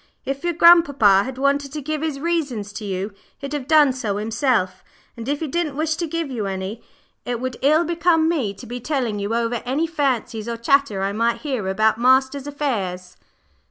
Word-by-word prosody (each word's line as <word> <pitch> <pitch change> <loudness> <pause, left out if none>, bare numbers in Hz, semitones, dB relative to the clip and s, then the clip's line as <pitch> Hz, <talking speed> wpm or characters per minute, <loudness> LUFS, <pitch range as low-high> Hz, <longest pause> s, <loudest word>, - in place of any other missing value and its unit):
"If 275 +2 -4
your 345 0 0
grandpapa 285 - +6
had 260 0 -6
wanted 280 +1 +1
to 305 - -3
give 310 +1 -3
his 310 -3 -2
reasons 280 -11 -2
to 215 - -6
you, 195 +1 -3 0.2
he'd 280 +1 -7
have 280 -3 -4
done 300 -4 +5
so 215 -6 -3
himself; 220 -2 0 0.3
and 230 +2 -6
if 290 +2 -1
he 320 - -2
didn't 310 -2 -2
wish 315 0 0
to 340 - -2
give 330 -2 -3
you 220 -5 -3
any, 195 +4 -5 0.4
it 245 -1 -3
would 255 0 -4
ill 305 +5 +4
become 335 -1 +2
me 265 -12 -1
to 220 - -11
be 245 +2 -6
telling 245 -6 -2
you 200 +3 -2
over 235 0 -1
any 270 +6 0
fancies 260 -8 -2
or 235 - -3
chatter 235 -4 +2
I 195 - 0
might 230 +3 0
hear 260 -10 -3
about 215 +3 +2
master's 260 +3 +3
affairs." 205 -12 -3
260 Hz, 195 wpm, -22 LUFS, 220-300 Hz, 0.4 s, grandpapa